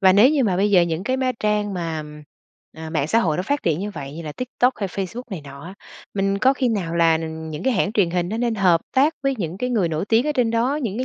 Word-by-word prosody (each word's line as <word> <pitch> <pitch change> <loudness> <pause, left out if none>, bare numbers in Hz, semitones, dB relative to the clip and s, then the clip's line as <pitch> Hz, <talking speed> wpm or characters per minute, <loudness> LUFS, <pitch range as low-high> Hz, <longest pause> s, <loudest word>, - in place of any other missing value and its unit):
Và 190 -2 +6
nếu 210 +8 +6
như 290 -4 +2
mà 190 -5 +1
bây 200 +3 +2
giờ 185 -3 +6
những 170 +1 -2
cái 260 +3 0
má 260 -1 0
trang 210 -1 0
mà, 165 -3 -3
ừm, 150 0 -10 0.5
à, 160 0 -8
mạng 155 -3 0
xã 225 - +2
hội 165 -9 +1
nó 180 - -1
phát 285 +9 -1
triển 165 0 0
như 205 +2 -3
vậy 140 -7 -7
như 170 - -6
là 155 -2 -6
TikTok 250 - 0
hay 200 -2 -3
Facebook 195 +6 -5
này 190 -5 -5
nọ 140 0 -11
á, 185 +3 -9 0.4
mình 195 0 0
có 260 +6 +4
khi 260 -2 0
nào 190 -7 -2
là, 165 -1 +4
ừm, 160 0 -6
những 150 - -6
cái 265 - +2
hãng 200 -1 0
truyền 195 -6 +2
hình 175 0 -1
nó 215 - -3
nên 235 -1 0
hợp 180 -5 +3
tác 285 +4 +3
với 275 0 +1
những 175 -1 -4
cái 250 +3 -2
người 210 -8 +1
nổi 160 +1 -2
tiếng 230 +5 +3
ở 300 - +1
trên 250 -5 +1
đó, 235 +5 +1
những 220 -3 -3
cái 255 - -1
195 Hz, 300 wpm, -22 LUFS, 165-235 Hz, 0.5 s, Và